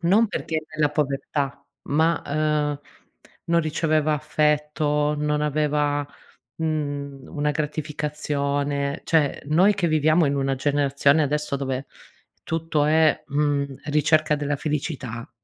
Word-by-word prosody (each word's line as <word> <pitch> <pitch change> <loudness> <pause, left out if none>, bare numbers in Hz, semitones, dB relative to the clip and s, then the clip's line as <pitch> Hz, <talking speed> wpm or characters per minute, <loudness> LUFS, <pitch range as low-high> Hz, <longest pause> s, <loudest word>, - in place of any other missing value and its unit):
...non 195 +7 +4
perché 165 -5 -3
è 155 0 -6
nella 150 -1 +2
povertà 140 -1 -2 0.2
ma, 160 +3 +2
ehm, 150 -1 0 0.6
non 170 0 +2
riceveva 155 -1 +1
affetto, 150 0 +1
non 150 0 0
aveva, 150 -1 +1 0.5
mhmm, 145 -3 -3
una 150 0 -1
gratificazione, 145 -2 -2
cioè 155 -4 +1
noi 185 +7 +4
che 195 -3 0
viviamo 155 +2 +3
in 140 - +1
una 135 -1 0
generazione 140 +2 +2
adesso 150 0 -1
dove 135 -1 -3 0.6
tutto 160 -2 -1
è, 155 0 +3
mhmm, 140 -1 0
ricerca 150 +1 +2
della 145 0 -1
felicità, 140 -6 -4
150 Hz, 115 wpm, -24 LUFS, 145-155 Hz, 0.6 s, non